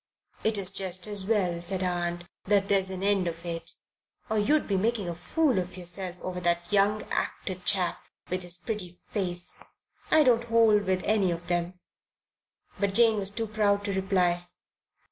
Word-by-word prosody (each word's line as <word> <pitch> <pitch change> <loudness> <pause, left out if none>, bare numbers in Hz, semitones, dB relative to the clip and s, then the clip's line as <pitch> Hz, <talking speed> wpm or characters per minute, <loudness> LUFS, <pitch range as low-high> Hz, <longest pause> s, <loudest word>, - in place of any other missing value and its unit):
"It's 200 -4 +1
just 185 -2 -3
as 205 -3 -4
well," 185 -6 +1
said 185 +2 -2
her - - +2
aunt, 175 -1 -2 0.2
"that 200 -1 +2
there's 195 -1 +4
an 190 0 -5
end 200 -2 +2
of 170 +1 -5
it, 165 -1 -2 0.6
or 220 - +2
you'd 290 +9 +2
be 200 - 0
making 210 0 0
a 170 - -2
fool 250 - +1
of 180 +1 -5
yourself 180 0 -2
over 180 -1 -4
that 175 +1 0
young 205 +1 +3
actor 190 - -2
chap 185 -1 0 0.3
with 185 +1 -2
his 175 0 +1
pretty 180 -2 -5
face. 180 -4 -4 0.5
I 310 -1 +6
don't 240 -3 +3
hold 225 -3 +4
with 185 -1 0
any 205 -3 +2
of 170 0 -3
them." 175 +1 -2 1.0
But 200 -1 0
Jane 230 -2 +5
was 195 -1 +2
too 225 +2 -3
proud 205 -1 +1
to 200 - -1
reply. 180 -2 +1
190 Hz, 175 wpm, -28 LUFS, 175-210 Hz, 1.0 s, I